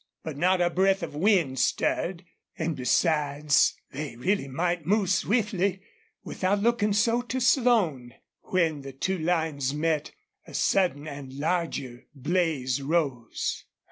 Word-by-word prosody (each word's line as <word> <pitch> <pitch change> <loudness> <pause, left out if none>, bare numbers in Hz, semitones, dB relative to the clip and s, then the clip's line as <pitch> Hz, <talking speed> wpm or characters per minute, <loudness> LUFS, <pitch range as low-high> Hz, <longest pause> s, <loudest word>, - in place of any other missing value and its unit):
But 160 -3 -5
not 180 +4 +2
a 175 0 +2
breath 190 +1 +2
of 165 - -5
wind 160 - +2
stirred, 175 0 0 0.3
and 160 -1 -2
besides 145 +2 +2 0.2
they 140 -3 -5
really 185 - 0
might 170 +5 -1
move 195 +2 +1
swiftly, 200 -3 +1 0.4
without 195 +2 -1
looking 220 -1 +2
so 230 +4 +2
to 250 +1 -3
Slone. 225 - +2 0.3
When 165 -5 0
the 135 0 -9
two 185 +7 -2
lines 155 -5 0
met 155 -1 0 0.4
a - - -10
sudden 175 -6 +1
and 140 -3 -8
larger 140 -5 -3
blaze 140 -3 0
rose. 140 -6 -2
165 Hz, 130 wpm, -27 LUFS, 140-190 Hz, 0.4 s, not